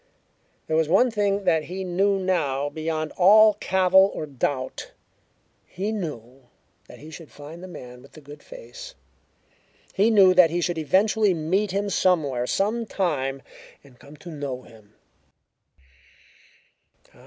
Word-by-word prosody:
There 155 - -2
was 160 -1 +1
one 240 +8 +3
thing 205 -2 -1
that 165 -4 +1
he 190 +2 -6
knew 195 +2 +1
now 150 -7 -1
beyond 155 0 -4
all 215 +4 +6
cavil 190 +1 +3
or - - -4
doubt: 135 -2 -4 0.7
he 200 +4 -4
knew 135 - -7 0.4
that - - -13
he 155 +2 -13
should 160 -1 -11
find 150 +4 -11
the 185 - -9
man 125 -8 -11
with 135 - -19
the - - -13
good 145 +1 -13
face. - - -12 1.0
He 205 +4 +2
knew 195 -4 +6
that 180 -2 +6
he 170 +2 -2
should 175 -1 -2
eventually 200 +5 +2
meet 185 +6 -1
him 200 +2 -2
somewhere, 145 -11 +1
sometime, 185 - -2 0.4
and 130 -3 -20
come 145 +2 -15
to 170 +4 -11
know 140 -4 -6
him. 110 -2 -19
175 Hz, 140 wpm, -24 LUFS, 145-195 Hz, 1.0 s, all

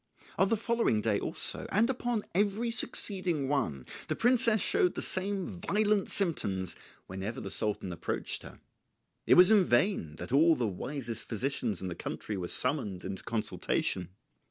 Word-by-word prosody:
On 190 - +4
the 225 - +2
following 230 - +1
day 105 -1 0
also, - - 0
and 215 +4 +3
upon 245 -4 -2
every 205 +5 0
succeeding 185 - +1
one, 120 - -2 0.2
the - - -2
princess 235 -2 +3
showed 390 - +2
the - - -3
same 190 0 -1
violent 210 +2 0
symptoms 100 - 0 0.3
whenever 95 +5 -6
the 95 - -7
Sultan 100 -3 -1
approached - - -3
her. - - -13 0.7
It - - +6
was 180 +3 +8
in 210 -3 +6
vain 120 - +1
that 90 +6 -8
all 160 +4 +5
the 120 - -1
wisest 115 +3 -5
physicians 115 -4 -2
in - - -3
the 90 - -4
country 105 - -6
were 90 -2 -4
summoned 115 - +2
into 95 0 -5
consultation. 105 -4 -2
145 Hz, 155 wpm, -30 LUFS, -, 0.7 s, was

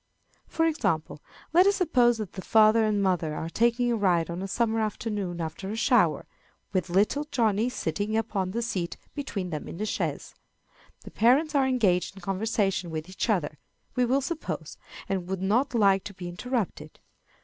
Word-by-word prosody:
For 325 - 0
example, 160 - -1 0.3
let 360 +3 +6
us 400 - +4
suppose 250 - +3
that 215 -5 -6
the 190 - -6
father 220 +2 +5
and 205 -2 +1
mother 175 -5 0
are 160 - -4
taking 240 +3 +2
a - - +2
ride 175 -6 +1
on 175 +2 -4
a 195 - -3
summer 225 +2 0
afternoon 210 -4 -3
after 165 +4 -5
a 215 - -3
shower, 225 - +3 0.5
with 185 -1 0
little 210 +11 +1
Johnny 225 -1 +2
sitting 210 -1 -2
upon 195 -4 -1
the 235 +5 -2
seat 180 -7 -3 0.2
between 200 -11 -4
them 150 -2 -4
in - - -7
the 210 - -2
chaise. 215 - -3 0.7
The - - -11
parents 275 +7 +3
are 275 -2 +3
engaged 200 -8 +1
in 195 - -12
conversation 195 -1 -1
with 160 +2 -5
each 190 +5 -3
other, 165 -8 0 0.4
we 250 -1 +3
will 265 +3 +2
suppose, 315 +4 -4 0.3
and 190 -2 -2
would 190 0 -3
not 240 +7 +1
like 195 -3 +4
to 205 - -8
be 180 -1 -7
interrupted. 180 - -4
205 Hz, 180 wpm, -27 LUFS, 185-240 Hz, 0.7 s, let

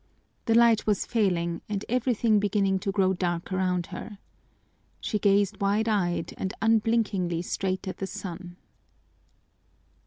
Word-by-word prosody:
The 225 - +2
light 230 -2 +4
was 210 -2 +1
failing 175 -7 0
and 205 -1 -3
everything 235 -3 +2
beginning 200 -1 +1
to 195 +1 -2
grow 190 -1 +2
dark 175 -1 -2
around 180 -2 0
her. 210 - -7 0.8
She 210 - -2
gazed 200 0 +2
wide 205 +3 +1
eyed 175 -6 0
and 190 - -3
unblinkingly 210 -6 +1
straight 185 +1 -2
at 185 - -4
the 195 - -4
sun. 175 -1 -7
195 Hz, 130 wpm, -27 LUFS, 185-215 Hz, 0.8 s, light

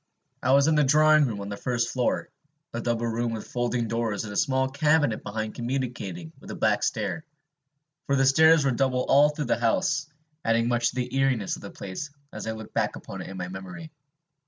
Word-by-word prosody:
I 130 - +3
was 140 0 +5
in 160 - +3
the 150 -1 +4
drawing 155 +2 +5
room 105 -4 -4
on 100 - -6
the 100 - -4
first 120 0 -1
floor, 125 -2 -1 0.4
a 120 - -3
double 120 0 -1
room 115 0 -1
with 110 - -5
folding 120 -1 -1
doors 115 -2 -1
and 105 -2 -6
a - - -7
small 130 +2 +2
cabinet 145 -3 +2
behind 110 +1 -4
communicating 120 -10 -4
with - - -13
a - - -5
back - - +1
stair; 160 - -2 0.8
for 140 - +2
the 135 0 +3
stairs 160 +2 +6
were 135 - +3
double 130 0 +1
all 145 +2 +6
through 150 0 -4
the 120 - 0
house, 145 +5 +1 0.4
adding 115 +1 +2
much 120 -1 +2
to - - -10
the 125 0 -3
eeriness 135 -7 +1
of - - -12
the - - -8
place 100 +10 -6 0.2
as - - -6
I 110 - -1
look 110 -1 -10
back - - 0
upon - - -8
it - - -8
in 95 - -8
my 90 -1 -4
memory. 95 - -8
120 Hz, 215 wpm, -26 LUFS, 110-140 Hz, 0.8 s, stairs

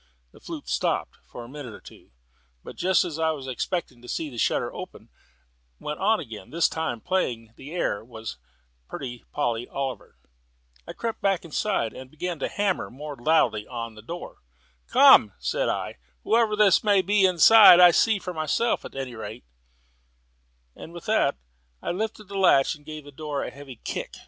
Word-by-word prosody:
The - - -18
flute - - -8
stopped - - -1
for 120 - -9
a - - -11
minute 130 -4 -8
or - - -14
so, - - -15 0.5
but - - -10
just 185 +1 +2
as 165 -3 -5
I 160 0 +2
was 145 -4 -4
expecting 130 -1 -3
to 120 - -14
see 150 +3 -3
the 120 - -7
shutter - - 0
open, - - -9 0.7
went 150 0 -5
on 215 +2 +2
again: 110 -4 -9
this 170 +1 +2
time 160 -8 -4
the 120 -6 -3
air 165 - -1
was 110 - -8 0.5
"Pretty 125 -2 -7
Polly 120 -4 -1
Oliver." 135 -2 -5 0.7
I - - -6
crept 230 -1 -4
back 195 -3 +1
again, 165 - -1
and 130 0 -10
began 165 +3 -5
to - - -1
hammer 200 -2 -1
more 145 +4 -8
loudly 120 -6 +2
at 115 -2 -6
the 110 - -13
door. 170 +11 -8 0.5
"Come," - - +7
said - - -1
I, - - -3 0.2
"whoever 225 -2 +2
this 210 -3 +4
may 200 -3 +4
be 200 +2 +2
inside, 185 +2 +8
I'll 175 -1 +8
see 220 +3 +3
for 180 -2 -6
myself 160 +9 0
at - - -10
any 135 -2 -5
rate," 110 +1 -8 1.3
and 165 - -11
with 175 - -10
that 215 -10 +2 0.4
I - - -3
lifted 215 +4 -3
the 200 0 -4
latch 140 -7 +4
and 150 -2 -14
gave 155 -1 -7
the 145 - -11
door 145 0 -4
a - - -5
heavy 140 -2 -11
kick. - - -5
150 Hz, 180 wpm, -25 LUFS, 125-185 Hz, 1.3 s, inside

